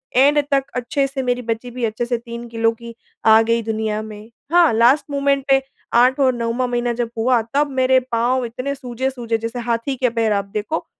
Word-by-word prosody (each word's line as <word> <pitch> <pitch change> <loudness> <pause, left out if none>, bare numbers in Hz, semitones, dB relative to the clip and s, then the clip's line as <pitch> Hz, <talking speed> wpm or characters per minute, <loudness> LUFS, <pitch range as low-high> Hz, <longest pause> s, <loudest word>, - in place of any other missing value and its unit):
And 285 +3 +5
तक 275 -1 +3
अच्छे 250 +3 0
से 270 0 -4
मेरी 250 0 -1
बच्ची 230 +1 -4
भी 245 0 -2
अच्छे 225 +2 -2
से 240 0 -1
3 235 0 -8
किलो 225 0 +1
की 235 0 -11 0.3
आ 220 0 +7
गई 230 +1 +1
दुनिया 220 -1 -2
में। 215 0 -10 0.2
हाँ 345 -2 +5
लास्ट 240 +7 +4
मोमेंट 280 -1 +1
पे 270 0 +5 0.3
8 250 +3 +4
और 260 -2 +3
9वाँ 240 +1 -1
महीना 240 0 -1
जब 235 -1 -2
हुआ 240 +1 +2
तब 290 +1 +2
मेरे 260 0 +4
पाँव 245 +2 +1
इतने 255 +4 -4
सूजे-सूजे 250 -3 -3
जैसे 230 +2 -5
हाथी 235 +3 -2
के 250 0 +1
पैर 225 -2 +2
आप 200 -1 -1
देखो 220 +11 -3
240 Hz, 200 wpm, -20 LUFS, 230-260 Hz, 0.3 s, आ